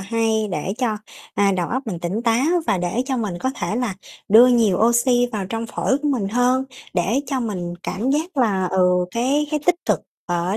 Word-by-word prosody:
hay 220 +1 0
để 180 +3 -2
cho, 230 -5 0 0.4
à, 200 -1 +3
đầu 175 -2 -1
óc 260 +3 -2
mình 180 -6 -3
tỉnh 185 +7 -2
táo 235 +3 +2 0.2
và 190 - +1
để 180 +8 -1
cho 265 -2 -1
mình 200 -7 -3
có 260 - 0
thể 220 - -3
là 245 -6 -1 0.3
đưa 225 +5 +8
nhiều 230 -7 +3
oxy 245 +1 +3
vào 200 -4 -3
trong 225 +2 -4
phổi 265 +4 0
của 295 - +1
mình 225 -8 0
hơn, 250 +3 +2 0.3
để 200 +9 +1
cho 265 -1 -1
mình 180 -6 -3
cảm 240 +7 -2
giác 315 +3 -1
là, 200 -8 +2
ừ, 180 -1 +2
cái 270 +7 +1
cái 300 -2 0
tích 355 - +5
cực - - +1 0.3
ở 175 +3 -1
225 Hz, 210 wpm, -21 LUFS, 190-250 Hz, 0.4 s, đưa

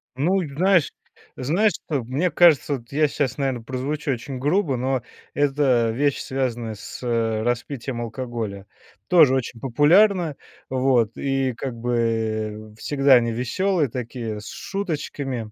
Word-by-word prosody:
Ну, 180 +9 +1
знаешь 170 +3 +2 0.4
знаешь, 180 +11 +2
что 145 -7 -3
мне 145 +9 0
кажется, 155 -3 +4
вот 120 -1 -17
я 150 +1 +3
щас, 140 -4 -2
наверно, 135 -4 -1
прозвучу 135 +5 -3
очень 130 +1 -5
грубо, 145 0 +1
но 130 +1 0 0.3
это 135 -5 +2
вещь, 140 +4 0
связанная 120 -4 -3
с, 100 - -9
э, 115 -2 0
распитием 120 +1 -3
алкоголя. 115 -4 -5 0.4
Тоже 155 -7 +6
очень 120 -2 -3
популярна, 160 - +3 0.3
вот, 130 -4 +2
и 135 -2 0
как 130 +1 -5
бы 110 -2 -2
всегда 135 +2 +4
они 115 -1 +3
веселые 150 +7 0
такие, 115 -2 -5
с 105 - -10
шуточками. 145 - -4
130 Hz, 130 wpm, -23 LUFS, 115-145 Hz, 0.4 s, Тоже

